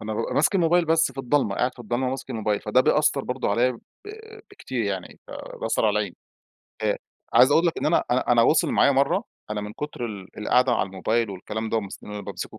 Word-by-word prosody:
فأنا 110 0 -4
بابقى 115 - -3
ماسك 155 - +2
الموبايل 175 -1 +3
بس 160 -3 +2
في 135 - -14
الضلمة، 135 -5 +1
قاعد 125 +4 0
في - - -26
الضلمة 120 +3 -2
وماسك 130 0 -5
الموبايل، 110 -3 -1
فده 115 +4 +2
بيأثر 145 0 +2
برضو 125 - -2
عليَّ 125 +2 +2
ب 115 - -11 0.7
بكتير 130 - -4
يعني، 95 -3 -4
فبيأثر 110 - -3
على 105 - +3
العين. 100 -4 -3 0.7
آآ، - - +1 0.4
عايز 125 +3 +7
أقول 165 +3 +4
لك 165 - 0
إن - - -1
أنا 155 - +2
أنا 125 0 +2
أنا 115 -1 +5
وصل 155 - +3
معايا 140 - +4
مَرّة، 140 - +2 0.3
أنا 105 -1 -2
من 105 0 -6
كتر 150 -1 -5
ال 100 -3 -9
القعدة 125 +4 +2
على 110 - +1
الموبايل 105 +4 -1
والكلام 105 +4 -5
ده، 115 - 0
ومس 100 -3 -4
إن - - -10
أنا 105 - -5
بامسكه - - -7
120 Hz, 220 wpm, -24 LUFS, 105-140 Hz, 0.7 s, عايز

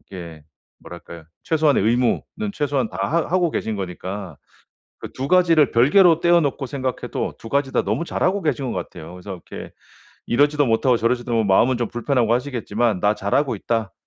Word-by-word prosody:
이게 85 -5 -10 0.4
뭐랄까요 85 -1 -11 0.2
최소한의 155 -7 +2
의무는 125 - 0
최소한 140 - -1
다 90 - -9
하 165 +1 0
하고 180 -2 +2
계신 110 -7 -3
거니까 95 -2 -6 0.6
그 - - -8
2 135 +1 -4
가지를 165 -5 +4
별개로 165 +8 +5
떼어 175 0 +4
놓고 140 -2 -2
생각해도 130 -2 -4
2 115 - -11
가지 140 0 0
다 - - +1
너무 170 - -2
잘하고 190 +3 0
계신 140 -6 -1
것 - - -4
같아요. 80 +2 -8
그래서 90 +2 -8 0.2
이렇게 - - -8 0.6
이러지도 145 +4 +2
못하고 120 +2 +2
저러지도 120 +2 -1
뭐 115 -1 +2
마음은 115 +6 +3
좀 120 -1 -2
불편하고 120 -1 0
하시겠지만 120 -5 -1
'나 105 +2 +2
잘하고 115 +6 0
있다.' 110 0 -2
125 Hz, 390 characters per minute, -21 LUFS, 105-145 Hz, 0.6 s, 별개로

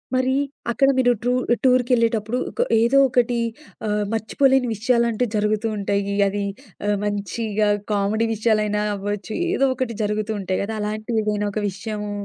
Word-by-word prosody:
మరీ, 260 0 +2 0.4
అక్కడ 270 +3 +3
మీరు 245 -1 +4
ట్రూ 245 0 +2 0.3
టూర్‌కెళ్ళేటప్పుడు 245 -2 +2 0.2
కొ - - +3 0.2
ఏదో 235 +4 +3
ఒకటి 245 -1 +2 0.5
ఆహ్, 210 0 0
మర్చిపోలేని 255 +4 +2
విషయాలంటూ 235 +1 +1
జరుగుతూ 210 +1 +1
ఉంటాయి. 200 0 -1
అది 200 +1 -2 0.4
ఆహ్, 205 -1 +2
మంచిగా 205 +1 -1 0.2
కామెడీ 210 +3 +1
విషయాలైనా 210 -1 +1
అవ్వచ్చు. 205 +2 -4 0.2
ఏదో 275 -8 +2
ఒకటి 240 -3 -3
జరుగుతూ 210 +1 -1
ఉంటాయి 185 -1 -2
గదా! 220 +2 -4
అలాంటిదేదైనా 210 -1 -1
ఒక 215 - -1
విషయము 210 +1 -5
215 Hz, 130 wpm, -22 LUFS, 205-240 Hz, 0.5 s, మీరు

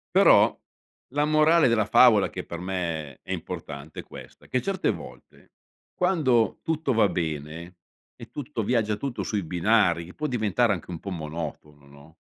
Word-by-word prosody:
Però, - - +6 0.5
la 145 +2 +1
morale 155 +1 +4
della 115 -3 +2
favola 110 -2 +5
che - - -6
per 85 - -7
me 85 -6 -3
è - - -31
è - - -2
importante, 70 +2 -7
è - - -19
questa: - - -13
che 125 - 0
certe 195 -2 -1
volte, - - -12 0.4
quando 140 - +2
tutto 160 -4 -1
va 110 -2 +4
bene 80 +1 -4 0.4
e - - -12
tutto 145 -5 -4
viaggia 110 -1 +1
tutto 130 +3 -4
sui 105 -3 -2
binari, 90 -1 +1
può 150 - -2
diventare 115 -2 +1
anche 90 -3 -7
un 85 - -6
po' 100 - -7
monotono, 75 -3 -7
no? 70 +3 -17
105 Hz, 160 wpm, -26 LUFS, 85-125 Hz, 0.5 s, Però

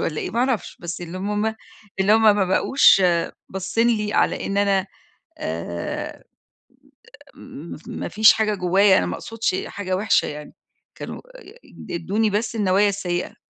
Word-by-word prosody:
والّا 155 -2 -2
إيه - - -4
ما 230 - -3
أعرفش، 255 -3 -1
بس 170 0 -6
اللي 175 +2 -7
مم 210 +2 -1 0.5
إن 190 +2 +2
هم 225 +1 +5
ما 210 -2 +5
بقوش 190 +2 +4 0.5
باصّين 195 +5 0
لي 210 -3 0
على - - +1
إن 195 - -3
أنا 195 -1 +2 0.5
آآ 85 +1 -5 1.1
م 160 +5 -10
ما - - -5
فيش 215 0 +6
حاجة 215 -1 0
جوّايا 190 +1 +4
أنا 90 - 0
ما 90 - -3
أقصدش 225 -4 -3
حاجة 185 -2 -3
وِحشة 205 +3 +2
يعني 150 0 -8 0.4
كانوا - - -8 0.2
آآ 480 - -15 0.4
ادّوني 200 +6 0
بس 220 +3 -2
النوايا 200 0 +3
السيّئة. 180 -3 -3
200 Hz, 150 wpm, -22 LUFS, 180-215 Hz, 1.1 s, فيش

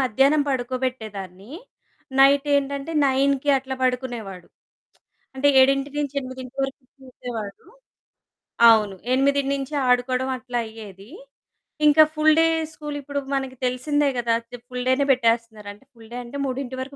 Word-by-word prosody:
మధ్యాహ్నం 270 +4 +3
పడుకోబెట్టేదాన్ని. 240 -6 -4 0.7
నైటేంటంటే 280 +1 +2
9కి 275 +1 +1
అట్లా 265 0 -6
పడుకునేవాడు. 240 -8 -3 0.9
అంటే 270 +2 +2
7-8 275 -1 -1
వరకు 270 0 -7 0.2
చూసేవాడు. 235 -5 -8 1.1
అవును. 210 -3 +3 0.2
ఎనిమిదినించి 275 +1 0
ఆడుకోవడం 255 +1 +1
అట్లా 245 -1 -4
అయ్యేది. 210 -1 -12 0.8
ఇంక 300 +1 +4 0.2
ఫుల్‌ 310 0 +4
డే 325 - +5 0.3
స్కూల్ 295 -1 -7
ఇప్పుడు 285 +1 -4 0.2
మనకి 265 -1 -4
తెలిసిందే 285 +4 0
కదా! 235 -1 0 0.4
ఫుల్ 250 0 -5
డేనే 270 +2 +2
పెట్టేస్తున్నారు 230 -4 0
అంటే, 205 - -22
ఫుల్ 225 -2 -16
డే - - -5
అంటే 240 +4 -8
3 260 0 -4
వరకు 275 +2 -8
260 Hz, 115 wpm, -23 LUFS, 240-280 Hz, 1.1 s, డే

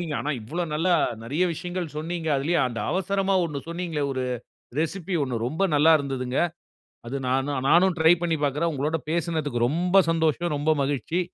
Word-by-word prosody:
சரிங்க, 165 -4 -4
ஆனா 150 - -2
இவ்வளோ 155 +11 -4
நல்ல 165 +4 0 0.3
நிறைய 145 +10 0
விஷயங்கள் 175 +2 -4
சொன்னீங்க. 165 +1 -3
அதுலேயே 160 +6 +1
அந்த 120 -2 -5
அவசரமா 195 +1 0
ஒண்ணு 150 -4 -3
சொன்னீங்களே, 170 -3 -3
ஒரு 130 -1 -2 0.6
ரெசிப்பி 175 +3 -2
ஒண்ணு, 130 -3 -3
ரொம்ப 160 +8 -1
நல்லா 150 +3 +6
இருந்ததுங்க. 130 -2 -3 0.7
அது 125 +4 -3
நானும் 135 +1 0
நானும் 175 +2 +5
ட்ரை 160 +1 +6
பண்ணி 165 -2 +1
பார்க்குறேன். 150 +4 0
உங்களோடு 150 +4 -1
பேசினதுக்கு 155 -7 0
ரொம்ப 180 +6 +3
சந்தோஷம். 165 0 +1
ரொம்ப 150 +2 +2
மகிழ்ச்சி. 145 +5 -1
160 Hz, 160 wpm, -25 LUFS, 140-175 Hz, 0.7 s, நல்லா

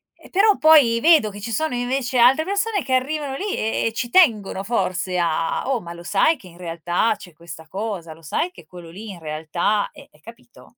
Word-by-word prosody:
E - - -18
però 405 +2 +3
poi 275 -6 +5
vedo 315 -10 +5
che 205 0 -10
ci 230 +3 -5
sono 310 +3 -1
invece 245 +1 -1
altre 260 +6 +5
persone, 405 0 -1
che 260 - -3
arrivano 275 +1 -1
lì 400 +6 -3
e 220 +1 -1
e 225 - -3
ci 240 +1 -3
tengono 220 - +3
forse 185 -4 -1
a 165 -1 0
a: - - -5
"Oh, 255 -4 0
ma 170 - -9
lo 170 0 -10
sai 240 - +2
che 190 - -15
in 170 -1 -16
realtà 175 +4 -1
c'è 180 - -14
questa 160 0 -12
cosa? 190 -4 -5
Lo 165 - -18
sai 330 - -2
che - - -15
quello 175 -2 -12
lì 205 +6 -10
in 185 - -9
realtà 160 +6 -1
è - - -15
è" 150 - -26
capito? 235 +2 -16
220 Hz, 225 wpm, -21 LUFS, 175-270 Hz, -, poi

